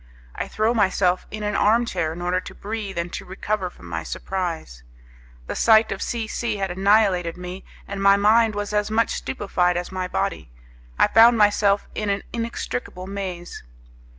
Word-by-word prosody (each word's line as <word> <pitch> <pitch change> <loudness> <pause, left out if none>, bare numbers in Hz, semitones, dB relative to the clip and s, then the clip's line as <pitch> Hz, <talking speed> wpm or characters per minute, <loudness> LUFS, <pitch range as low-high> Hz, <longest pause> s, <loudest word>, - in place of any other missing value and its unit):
I - - -4
throw 220 +2 +1
myself 190 -4 +1
in 215 0 -6
an 210 -1 -1
arm 230 +5 +3
chair 160 -8 -2
in 175 +2 -6
order 180 +1 +1
to - - -10
breathe 205 -2 -5
and 170 +1 -3
to - - -5
recover 190 0 -3
from 90 - -16
my 85 -1 -4
surprise. 165 - -4 0.6
The - - -4
sight 220 -1 +5
of 195 - -4
C 235 -2 -2
C 220 0 -2
had 195 -2 -2
annihilated 190 -3 +2
me, 180 +1 -7 0.2
and 200 0 -5
my 200 0 +6
mind 215 +2 +4
was 205 0 -3
as 210 0 +1
much 225 +1 +1
stupefied 180 -7 0
as 175 +2 -4
my 185 -1 -3
body. - - -2 0.5
I - - +5
found 230 +1 +6
myself 205 -1 +3
in 210 -1 -2
an 200 0 -1
inextricable 230 - -4
maze. 190 -3 -6
200 Hz, 180 wpm, -23 LUFS, 180-215 Hz, 0.6 s, my